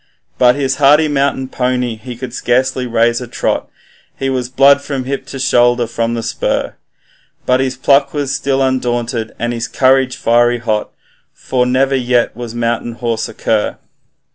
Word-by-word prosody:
But 125 -1 +5
his 135 -2 -1
hardy 150 +2 +5
mountain 140 -2 0
pony 125 -2 -1
he 120 +3 -9
could 120 0 -7
scarcely 130 +1 0
raise 120 +1 +1
a 125 - -6
trot, 120 - -2 0.5
He 135 0 -2
was 125 -2 -2
blood 140 +2 +5
from 140 -2 -4
hip 135 +2 -4
to 135 - -7
shoulder 120 -2 +3
from 115 0 -2
the 115 - -3
spur; 115 - -2 0.7
But 125 0 +2
his 130 -1 -1
pluck 140 +1 +3
was 145 -2 -2
still 135 -1 0
undaunted, 120 -3 -2
and 120 +1 -2
his 115 0 -3
courage 130 -1 +2
fiery 120 +1 +2
hot, 110 -3 -2 0.5
For 125 -1 -1
never 135 +2 +2
yet 125 -3 +1
was 120 -1 -7
mountain 120 0 -2
horse 115 -1 -3
a - - -11
cur. 110 -2 -1
125 Hz, 165 wpm, -15 LUFS, 120-135 Hz, 0.7 s, But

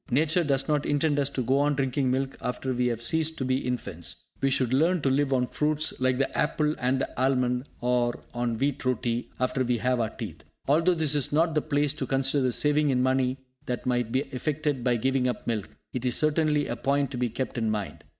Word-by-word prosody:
Nature 155 +7 +2
does 135 -3 0
not 150 -2 +1
intend 145 0 +1
us 140 -1 +1
to 130 -2 -2
go 130 +4 +2
on 145 0 +2
drinking 135 -1 0
milk 135 +1 -1
after 130 +1 -2
we 125 0 +1
have 120 -1 -2
ceased 160 +5 0
to 130 - -2
be 130 +1 +1
infants. 100 - -5 0.2
We 135 - +3
should 130 -2 +1
learn 165 +4 +2
to 135 - +2
live 140 +1 +1
on 125 -2 +2
fruits 155 +4 0
like 130 0 +2
the 135 - -1
apple 150 0 +1
and 130 +1 +1
the 130 - -3
almond, 125 -1 +1 0.2
or 120 -1 +1
on 120 -1 -1
wheat 140 +2 -1
roti, 120 -2 -1
after 130 +1 0
we 125 -1 +1
have 125 +2 +1
our 110 -2 0
teeth. 105 - -8 0.2
Although 165 +6 +3
this 155 -3 +1
is 145 -3 +1
not 160 +2 +2
the 150 - +2
place 145 -2 0
to 135 -3 -4
consider 135 +2 +2
the 125 - +2
saving 150 +3 +3
in 125 -2 +2
money 130 0 +1 0.3
that 125 -1 -3
might 125 -2 0
be 130 - +2
effected 145 0 -2
by 125 -1 +2
giving 130 +2 +1
up 125 -3 -3
milk, 110 -4 -2 0.2
it 125 - -3
is 125 -2 +1
certainly 155 -1 +2
a 120 - -3
point 140 +3 0
to 130 - -4
be 125 -1 +1
kept 130 +3 -4
in 115 -3 0
mind. 105 -3 -4
130 Hz, 230 wpm, -27 LUFS, 125-145 Hz, 0.3 s, We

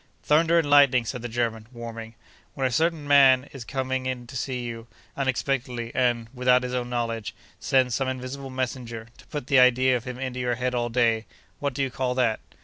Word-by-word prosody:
'Thunder 165 +3 +4
and 165 -3 +2
lightning!' 140 -4 +5
said 125 +1 -4
the 120 - -5
German, 115 -1 -2
warming, 115 -2 -8 0.4
'when 135 - -1
a 130 - +1
certain 160 +2 0
man 135 -2 +6
is 135 -4 -7
coming 130 -1 -3
to 130 - -12
see 125 0 -3
you, 115 -1 -7 0.3
unexpectedly; 130 -3 -2
and, 120 -3 +1
without 125 0 +3
his 125 0 -4
own 125 -1 -2
knowledge, 115 -3 -3 0.2
sends 130 -2 +2
some 135 +2 0
invisible 130 +1 -5
messenger, 120 -3 -4
to - - -17
put 150 -4 -5
the 135 0 +4
idea 125 +1 +5
of 120 - -4
him 125 -1 -6
into 130 -1 -4
your 125 -1 0
head 125 +1 -2
all 120 -1 -1
day, 115 -2 +1 0.3
what 140 -3 -2
do 140 - 0
you 135 - -2
call 125 0 -2
that? 120 -4 +1
125 Hz, 200 wpm, -25 LUFS, 120-130 Hz, 0.4 s, man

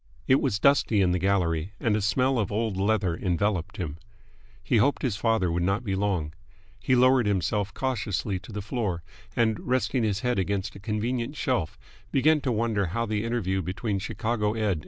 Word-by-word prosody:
It 130 - +4
was 100 - +1
dusty 120 -3 +3
in 90 -2 +3
the 90 - +1
gallery, 90 -2 0
and 110 -3 +1
a 105 - 0
smell 130 +5 +2
of 105 -3 -1
old 110 -1 -1
leather 100 -3 +1
enveloped 90 0 -1
him. 80 -3 -4 0.6
He 120 - +2
hoped 140 +7 +2
his 125 -7 0
father 105 -4 +1
would 85 +1 0
not 100 +6 0
be 100 -5 -2
long. 95 -6 -1 0.5
He 130 - +2
lowered 130 -2 +4
himself 100 +1 0
cautiously 105 -6 -2
to 90 - -12
the 105 -1 -5
floor, 100 -6 -2 0.3
and, 110 -2 +2
resting 125 0 0
his 105 -2 0
head 125 -4 0
against 95 +1 -2
a - - -9
convenient 115 +5 -2
shelf, 125 - -1 0.3
began 150 +3 +3
to 130 - -1
wonder 110 -4 0
how 115 +7 -1
the 105 -1 -1
interview 105 -5 -1
between 95 +4 -2
Chicago 110 +1 -1
Ed. 105 -7 0
105 Hz, 185 wpm, -27 LUFS, 95-115 Hz, 0.6 s, It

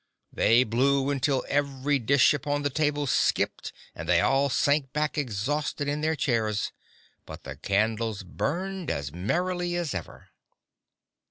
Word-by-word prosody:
They 120 +3 +4
blew 135 +4 +1
until 135 -1 0
every 140 0 0
dish 140 +4 +4
upon 145 0 -2
the 145 - 0
table 145 0 0
skipped 135 - 0 0.2
and 80 - -7
they 85 -1 +5
all 135 +6 +2
sank 140 0 +1
back 150 0 -1
exhausted 145 +3 -2
in 145 +1 -1
their 160 +1 +1
chairs, 110 -7 0 0.6
but - - -9
the 70 0 -7
candles 110 +4 0
burned 180 - -3
as 70 0 -3
merrily 175 - -1
as 175 -4 -2
ever. 95 - -8
140 Hz, 140 wpm, -27 LUFS, 110-150 Hz, 0.6 s, they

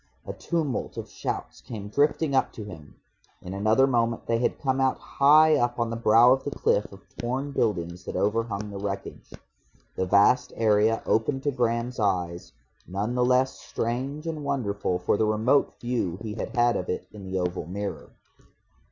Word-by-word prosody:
A - - -5
tumult 155 -8 -3
of - - -5
shouts - - -5
came 105 -4 -7
drifting 145 +5 +1
up 130 - +2
to 110 - -7
him. 85 -8 -11 0.4
In 90 - -8
another 110 +6 +3
moment 115 -3 0
they 115 0 +1
had 120 - 0
come 135 -1 0
out 130 -1 +2
high 155 +3 +5
up 120 0 0
on 115 -1 0
the - - -2
brow 115 +2 +6
of 135 - -2
the - - -2
cliff 105 -6 0
of 100 0 -13 0.2
torn 130 +4 -2
buildings 90 -8 -1
that - - -5
overhung 105 -1 -1
the 100 - -6
wreckage. 100 -1 -6 0.6
The 95 - -1
vast 115 +7 +4
area 110 0 +2
opened 135 +5 0
to 145 - +1
Graham's 120 -1 -1
eyes, 90 -4 -1 0.4
none 100 +6 -2
the 125 0 +1
less 130 +1 +3
strange 135 +6 -3
and 160 -2 -4
wonderful 105 -10 -1
for 90 +3 0
the 110 - +2
remote 110 +6 +2
view 120 -8 -2
he 110 -2 -4
had 115 - -5
had 120 0 +3
of 90 - -5
it - - -3
in 105 -2 -10
the 95 0 -3
oval 90 -2 -2
mirror. 100 +2 -5
115 Hz, 180 wpm, -26 LUFS, 100-130 Hz, 0.6 s, brow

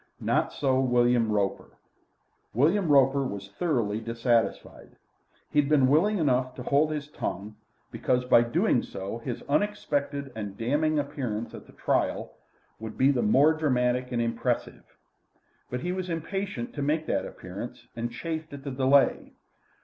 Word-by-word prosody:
Not - - +1
so 130 -2 +1
William 120 -3 +3
Roper; 100 -2 -2 0.8
William 170 - +3
Roper 140 -1 +4
was 100 -5 -6
thoroughly 115 - -1
dissatisfied. 115 +1 -1 0.6
He 150 - +3
had 145 -1 +2
been 145 -4 +5
willing 180 +10 +3
enough 130 -5 +1
to 125 - -7
hold 145 +4 +2
his 150 -2 -4
tongue, 105 -7 -5 0.4
because 125 0 0
by 120 -2 +6
so 120 - -2
doing - - +2
his 115 +5 -6
unexpected 145 -6 -1
and 105 -3 -6
damning 150 +6 +1
appearance 135 -7 -3
at - - -10
the - - -17
trial - - -1 0.5
would 110 0 -7
be 135 +2 +5
the 130 -3 0
more 140 +9 +5
dramatic 125 -4 0
and 120 - -1
impressive. 115 0 -2 0.8
But 125 0 -3
he 175 - -2
was 185 0 -3
impatient 170 -5 -4
to 145 - -4
make 155 +3 0
that - - -1
appearance, - - -9
and 120 0 -3
chafed 160 +5 -5
at 140 -1 -8
the 140 - -4
delay. 135 +1 +2
130 Hz, 150 wpm, -27 LUFS, 120-150 Hz, 0.8 s, by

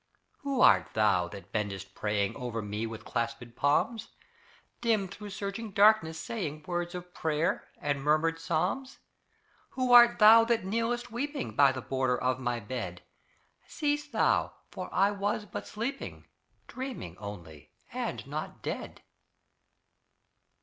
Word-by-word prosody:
Who 275 -3 -1
art - - +5
thou 105 -5 +3
that 95 +3 -11
bendest 95 -3 -3
praying 105 -1 -1
Over 115 -3 -4
me 105 +2 -3
with 115 0 -8
clasped 115 0 -3
palms; 150 - +1 0.7
Dim 220 -5 +2
through 205 +3 -9
surging 200 +2 -5
darkness, 200 -6 +4
saying 155 -8 -4
Words 175 0 -3
of 180 0 -8
prayer 160 0 -1
and 145 -1 -1
murmured 155 +3 +2
psalms? 185 - -1 0.8
Who 255 -1 +2
art 240 0 +9
thou 225 +1 +9
that 230 -4 +1
kneelest 235 +4 -1
weeping 275 +4 -3
By 140 -1 +6
the 130 -1 -6
border 130 -2 0
of 130 0 0
my 125 -2 -1
bed? 120 +2 -5 0.6
Cease 295 -1 -1
thou, - - +1 0.2
for 185 -1 -6
I 195 +2 +3
was 205 +1 -2
but 190 - -7
sleeping 240 +6 -5 0.4
Dreaming, 255 - -6
only, 85 -7 -9 0.2
and - - -3
not - - -6
dead! - - -5
165 Hz, 135 wpm, -30 LUFS, -, 0.8 s, art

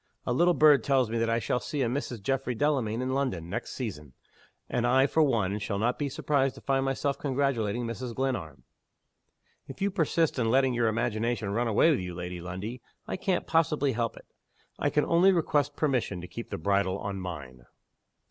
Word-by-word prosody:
A 120 - 0
little 175 +6 +3
bird 150 -5 +6
tells 130 -5 +2
me 115 - 0
that 115 0 +1
I 115 - +2
shall 120 +1 0
see 140 +3 -2
a - - +1
Mrs. 120 -4 -3
Geoffrey 135 +1 -1
Delamayn 125 -4 0
in 130 0 -1
London, 120 -12 -2
next - - -4
season. 75 -3 -6 0.5
And 120 0 0
I, 130 +2 +5
for 160 +3 +2
one, 105 -8 +1
shall 100 0 -3
not 115 +4 0
be 145 -1 -1
surprised 135 0 0
to - - -12
find 135 -1 +1
myself 135 +1 -1
congratulating 125 -5 0
Mrs. 115 +1 -5
Glenarm." 90 - -3 1.0
"If 135 - -9
you 200 +1 +1
persist 165 -5 +1
in 115 -2 +1
letting 130 +1 +3
your 120 -1 +1
imagination 115 -1 -1
run 120 +4 0
away 115 +9 +4
with 145 - +1
you, 90 -1 -5
Lady 90 0 -5
Lundie, 95 +8 -6 0.3
I - - -2
can't 185 -1 -1
possibly 155 -3 +2
help 115 -1 -2
it. - - -13 0.5
I - - +1
can 150 - +1
only 175 +3 +5
request 145 -5 +1
permission 130 - 0
to 90 - -8
keep 115 - -8
the - - -4
bridle 100 +2 +1
on 100 -1 -4
_mine. 70 -9 -8
120 Hz, 195 wpm, -28 LUFS, 105-140 Hz, 1.0 s, bird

